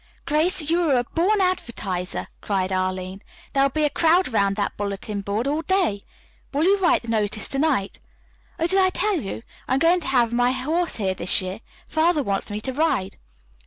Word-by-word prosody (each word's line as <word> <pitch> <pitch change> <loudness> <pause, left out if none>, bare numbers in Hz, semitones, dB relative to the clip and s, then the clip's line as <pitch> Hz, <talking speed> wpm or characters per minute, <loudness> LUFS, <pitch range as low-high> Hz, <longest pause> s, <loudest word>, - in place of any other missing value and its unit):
"Grace, 315 +3 +2
you 335 +2 +2
are 305 -6 +3
a 245 - +2
born 365 - +1
advertiser," 220 - -2
cried 190 -2 -1
Arline. 185 0 -2 0.3
"There 275 - +3
will 275 - +4
be 305 +3 -1
a 295 - +3
crowd 340 +3 +3
around 200 -2 +2
that 205 -1 -2
bulletin 200 0 -4
board 205 +5 -2
all 300 +3 0
day. 355 - +1 0.5
Will 290 +2 0
you 395 +3 +4
write 355 -8 +3
the - - -11
notice 215 -2 -1
to 270 - -2
night? 275 -10 0 0.6
Oh, 330 - 0
did 380 +3 +2
I 375 -1 +5
tell 370 -2 0
you? 205 +2 -6 0.2
I'm 260 - +2
going 335 +5 +4
to - - -7
have 240 -3 +2
my 245 +1 +2
horse 315 +7 -1
here 195 -4 -1
this 180 -1 +1
year. 185 +2 -5 0.3
Father 315 -1 +2
wants 200 -2 -2
me 205 0 -3
to 260 +3 -4
ride." 260 -10 0
260 Hz, 200 wpm, -23 LUFS, 200-330 Hz, 0.6 s, I